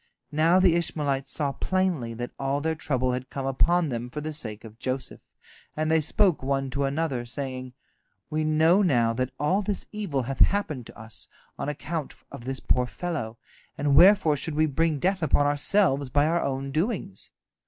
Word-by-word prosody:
Now 165 +4 +4
the 185 -3 +5
Ishmaelites 145 -5 -1
saw 145 -3 -1
plainly 170 -9 -1
that 120 +1 -5
all 135 +1 0
their 160 +2 0
trouble 130 -5 -1
had 125 +1 -4
come 135 -1 -4
upon 165 +5 +2
them 120 -1 -4
for 135 - -5
the 155 +1 -4
sake 110 -8 -5
of 110 0 -12
Joseph, 130 0 -4 0.6
and 155 0 0
they 160 0 +4
spoke 180 +3 +2
one 135 0 -1
to 140 +1 0
another, 140 -3 -1
saying: 130 +1 -5 0.5
"We 155 0 -1
know 160 +5 +4
now 120 - +3
that 130 +2 -1
all 180 +8 +2
this 200 -1 -3
evil 190 -11 -2
hath 135 +2 -5
happened 155 - +2
to - - -14
us 110 0 -8 0.3
on 140 - -2
account 150 +1 -4 0.2
of 120 - -9
this 135 0 -3
poor 125 -1 +1
fellow, 135 -9 -4 0.4
and 145 -1 +2
wherefore 185 -4 +6
should 150 +2 -3
we 155 +1 +3
bring 155 +1 +1
death 185 +5 0
upon 145 -2 +3
ourselves 145 -1 +2
by 145 +3 +3
our 170 +2 +1
own 135 0 -2
doings? 160 - -2
145 Hz, 185 wpm, -26 LUFS, 130-165 Hz, 0.6 s, wherefore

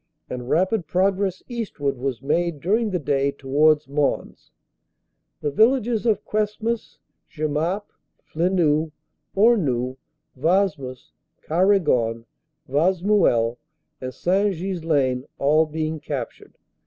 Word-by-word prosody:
and 125 0 -5
rapid 185 +1 +1
progress 190 +1 0
eastward 205 - -3
was 130 -1 -4
made 170 +2 0
during 215 +8 +1
the 185 - 0
day 140 -3 +1
towards 145 +2 +2
Mons, 140 0 -2 0.9
the 150 - -1
villages 235 - +2
of 220 - +1
Cuesmes, 215 +2 -2 0.3
Jemappes, 155 +6 -1 0.4
Flenu, 160 -2 +1 0.5
Hornu, 145 - +2 0.4
Wasmes, 150 -4 0 0.4
Quaregon, 155 - +2 0.4
Wasmuel, 165 - +2 0.4
and 130 0 -4
St. 190 +7 +1
Ghislain 160 -8 0
all 155 +3 +3
being 155 0 -3
captured. 135 -6 -6
160 Hz, 95 wpm, -23 LUFS, 140-195 Hz, 0.9 s, all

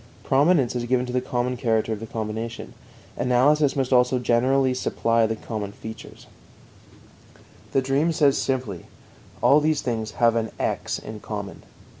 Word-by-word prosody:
Prominence 140 -2 +3
is 120 - -1
given 125 +1 +1
to 125 - -6
the 125 - +1
common 125 0 -2
character 110 -2 0
of 105 - -5
the 115 - -7
combination. 110 +1 -5 0.4
Analysis 135 +4 +3
must 135 -1 0
also 125 +1 +4
generally 130 +2 +2
supply 115 -2 +1
the 110 - -2
common 105 -3 -5
features. 110 +1 -10 1.5
The 135 - +1
dream 140 +5 +1
says 145 -3 +3
simply: 125 -10 -2 0.6
All 145 - +6
these 155 0 0
things 110 -3 -3
have 115 -1 +3
an 115 -1 -1
"x" - - -2
in 110 -1 -8
common. 105 -2 -6
125 Hz, 150 wpm, -24 LUFS, 110-135 Hz, 1.5 s, All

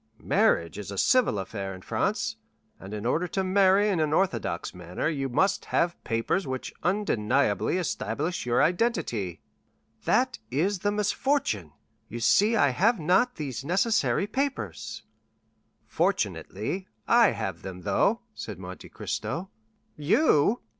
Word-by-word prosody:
Marriage 85 +3 +1
is 100 - -7
a 100 - -6
civil 250 - +3
affair 95 0 -4
in 95 - -13
France, - - -1 0.4
and 95 - -10
in 105 +1 -5
order 160 +9 +1
to 190 +2 -1
marry 195 +2 +4
in 195 -5 +1
an 155 -1 +1
orthodox 120 - 0
manner 90 - -4
you 140 -4 -1
must 190 +10 +1
have 170 0 0
papers 115 +11 -1
which 130 -1 -4
undeniably 140 - +1
establish 160 - -2
your 120 0 +2
identity." 150 - 0 0.6
"That - - +2
is 180 +9 0
the 205 +3 0
misfortune! 210 - 0 0.4
You 120 - -5
see 205 - +4
I 145 -10 +4
have 205 - +2
not 185 +10 +2
these 135 -5 -5
necessary 195 - +1
papers." 270 +6 -3 0.8
"Fortunately, 190 0 -1 0.2
I - - +5
have - - -4
them, 90 -1 -7
though," 215 - +1
said 105 - -7
Monte 90 0 -9
Cristo. 180 +3 -4 0.5
"You?" 170 - +3
155 Hz, 135 wpm, -27 LUFS, -, 0.8 s, I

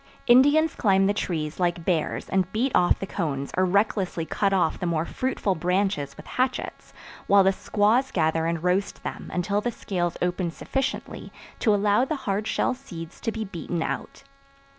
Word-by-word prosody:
Indians 290 +6 +5
climb 195 -2 +3
the 200 - +2
trees 160 -6 -3
like 175 -2 0
bears 165 -4 -1
and 190 -1 0
beat 250 +5 0
off 175 -1 +4
the - - -4
cones 140 -7 -3
or 185 - +3
recklessly 190 -3 0
cut 200 +4 0
off 185 -4 +1
the 180 - -2
more 165 -1 0
fruitful 255 -5 -1
branches 180 -4 -1
with - - -11
hatchets, 255 0 -2 0.4
while 200 -1 +6
the 195 +1 +3
squaws 220 +8 +2
gather 160 -1 +1
and 170 -1 -2
roast 180 +2 0
them - - -6
until 200 +3 0
the 240 - -1
scales 175 -5 -3
open 180 0 -1
sufficiently 270 - -4 0.3
to 215 -3 +3
allow 205 +3 +3
the 290 +4 -1
hard 205 +2 -1
shell - - +1
seeds 170 -11 -10
to 225 - -1
be 220 0 -4
beaten 170 -3 -4
out. - - -5
190 Hz, 175 wpm, -25 LUFS, 170-215 Hz, 0.4 s, while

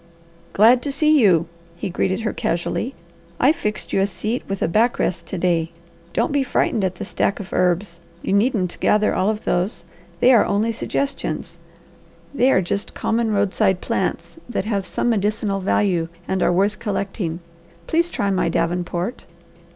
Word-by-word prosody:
"Glad 235 +5 +6
to 285 - -3
see 305 +2 +4
you!" 175 -6 +4 0.3
he - - -4
greeted 190 +4 0
her 220 - -2
casually. 220 +9 -2 0.4
"I've 285 +6 +4
fixed 210 -6 -4
you - - +3
a 195 - +2
seat 215 +5 -3
with 195 0 -2
a - - +2
back 225 +8 +2
rest 170 -1 -2
to 190 - -4
day. 170 -2 0 0.4
Don't - - 0
be 285 0 +2
frightened 240 -4 0
at 185 -1 -1
the - - -6
stack 200 - -1
of 195 - -8
herbs. 180 0 0 0.2
You - - -1
needn't 200 -4 +1
gather 210 0 +3
all 190 - +1
of 215 0 -2
those. 180 +1 -1 0.4
They 255 - +6
are 230 - +6
only 210 +3 +1
suggestions. 275 +4 -3 0.7
They 265 -1 +3
are 190 - +3
just 200 +4 -3
common 225 0 0
roadside 200 -2 +1
plants - - -2
that 210 -4 -2
have 200 -3 -1
some 240 - 0
medicinal 210 -1 0
value 185 -3 +1 0.2
and 190 -1 -1
are - - +3
worth 200 +4 +1
collecting. 195 -5 -3 0.5
Please 335 +2 +1
try 200 -11 -1
my 180 -3 +1
davenport." 175 +6 -2
200 Hz, 170 wpm, -21 LUFS, 180-230 Hz, 0.7 s, Glad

